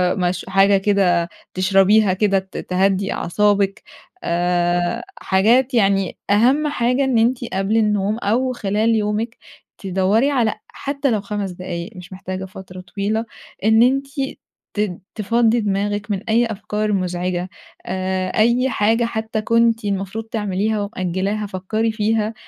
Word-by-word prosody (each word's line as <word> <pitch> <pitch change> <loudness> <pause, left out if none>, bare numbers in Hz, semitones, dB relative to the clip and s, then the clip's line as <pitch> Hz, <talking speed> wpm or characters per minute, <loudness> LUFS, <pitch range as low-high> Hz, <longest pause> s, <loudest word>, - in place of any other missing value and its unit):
مش 180 -1 -1
حاجة 195 +1 +4
كده 190 -4 +2 0.2
تشربيها 195 +2 +4
كده 195 0 +2
ت 190 0 -11
تهدّي 195 +1 0
أعصابِك 200 +2 +1 0.4
آآ 175 0 0 0.2
حاجات 235 +8 +3
يعني، 195 -5 +2
أهم 255 +9 +3
حاجة 250 -1 +1
إن 265 -3 +1
أنتِ 235 +3 +2
قبل 195 +3 +1
النوم 210 -1 +1
أو 240 +4 0
خلال 220 0 +1
يومِك 215 +2 -1 0.4
تدّوري 195 +7 +1
على 235 -6 +2
حتى 280 -1 -2
لو 215 - 0
5 200 -1 -4
دقايق 175 0 -6
مش 180 +1 -10
محتاجة 185 0 -5
فترة 185 -1 -10
طويلة، 200 +5 -2 0.4
إن 220 +2 +5
أنتِ 270 +3 +2 0.7
ت 210 -2 0 0.2
تفضّي 230 +2 +2
دماغِك 205 0 -1
من 195 - -1
أي 230 +2 +4
أفكار 215 -1 -2
مزعجة 180 -1 -2 0.4
آآ، 185 0 -2
أي 240 +4 +3
حاجة 225 +1 +2
حتى 220 -1 -3
كنتِ 230 0 +2
المفروض 200 +2 -3
تعمليها 210 -1 -1
ومأجّلاها 200 +1 -2
فكّري 210 +4 -2
فيها 220 0 0
205 Hz, 130 wpm, -20 LUFS, 190-225 Hz, 0.7 s, إن